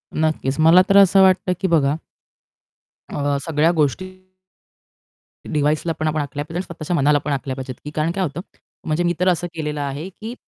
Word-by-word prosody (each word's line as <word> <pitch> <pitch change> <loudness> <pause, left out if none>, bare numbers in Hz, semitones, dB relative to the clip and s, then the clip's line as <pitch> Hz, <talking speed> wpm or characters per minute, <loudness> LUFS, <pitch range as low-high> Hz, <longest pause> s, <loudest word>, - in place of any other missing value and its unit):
नक्कीच, 155 -2 -1
मला 165 +3 +7
तर 200 - +5
असं 195 0 +6
वाटतं 185 -1 +3
की 190 - +1
बघा 150 -4 +2 1.2
अ, 145 -1 0
सगळ्या 160 +1 +2
गोष्टी 160 +3 0 1.5
डिव्हाइसला 150 +3 +1
पण 155 - 0
आपण 155 0 0
आखल्या 145 +1 -4
पाहिजेत 165 +1 -6
आणि 185 - -2
स्वतःच्या 170 +1 -4
मनाला 145 0 +3
पण 150 - -1
आखल्या 135 -1 -3
पाहिजेत, 130 -2 -6
की 150 - -6
कारण 155 +2 0
काय 190 +1 -2
होतं? 165 +1 -4 0.4
म्हणजे 160 +3 0
मी 175 0 +1
तर 180 - +1
असं 175 0 0
केलेलं 150 -2 -4
आहे 145 +6 -4
की 220 +5 -8
155 Hz, 185 wpm, -20 LUFS, 145-175 Hz, 1.5 s, मला